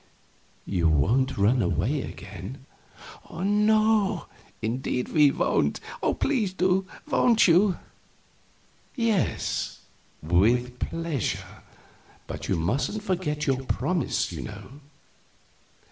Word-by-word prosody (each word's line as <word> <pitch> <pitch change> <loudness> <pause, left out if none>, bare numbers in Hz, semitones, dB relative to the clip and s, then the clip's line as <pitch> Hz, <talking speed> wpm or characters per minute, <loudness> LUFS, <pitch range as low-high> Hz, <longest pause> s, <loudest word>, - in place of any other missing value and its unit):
"You 85 -4 +1
won't 115 - +2
run 110 +5 +3
away 95 - 0
again?" 100 +7 -8 0.7
"No 210 +1 +2 0.3
indeed 125 +2 -2
we 150 -3 +5
won't. - - +1 0.4
Please 230 -10 +1
do. 185 0 +1 0.2
Won't 245 -7 +4
you?" 180 +2 +4 1.2
"Yes, 230 - -1 0.4
with 120 +9 +2
pleasure; 165 - -3 0.6
but - - -6
you - - +2
mustn't 130 - -1
forget 170 -7 -1
your 135 -1 0
promise, 175 +5 -1
you - - -5
know." - - -9
150 Hz, 90 wpm, -26 LUFS, 115-195 Hz, 1.2 s, we